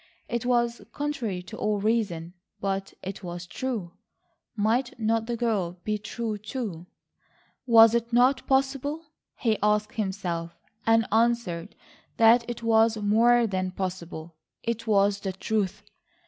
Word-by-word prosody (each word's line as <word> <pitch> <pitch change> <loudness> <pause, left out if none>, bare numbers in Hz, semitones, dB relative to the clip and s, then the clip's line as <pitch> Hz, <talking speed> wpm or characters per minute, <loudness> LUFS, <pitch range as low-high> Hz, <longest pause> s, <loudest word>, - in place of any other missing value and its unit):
It 240 0 -2
was 235 -2 +1
contrary 240 -11 -3
to 220 +4 -9
all 210 -1 0
reason, 200 -6 -1 0.3
but 195 0 -3
it 195 +2 -6
was 175 0 -6
true. 215 -3 -4 0.6
Might 235 +4 0
not 225 0 +1
the 240 -1 -2
girl 210 -7 0
be 215 -1 -1
true 215 0 -4
too? 205 -6 -5 0.8
Was 225 -1 +8
it 235 0 0
not 255 +3 +3
possible, 275 +3 0 0.3
he 220 -3 +1
asked 210 0 +1
himself, 185 -6 -3 0.3
and 225 0 +5
answered 225 -7 +1 0.4
that 230 +1 +5
it 235 -1 -5
was 225 0 +4
more 230 +3 +4
than 185 -3 -1
possible, 175 -3 -5 0.3
it 230 -1 -3
was 200 -1 +3
the 195 -1 -4
truth. 205 0 -2
220 Hz, 135 wpm, -26 LUFS, 195-235 Hz, 0.8 s, Was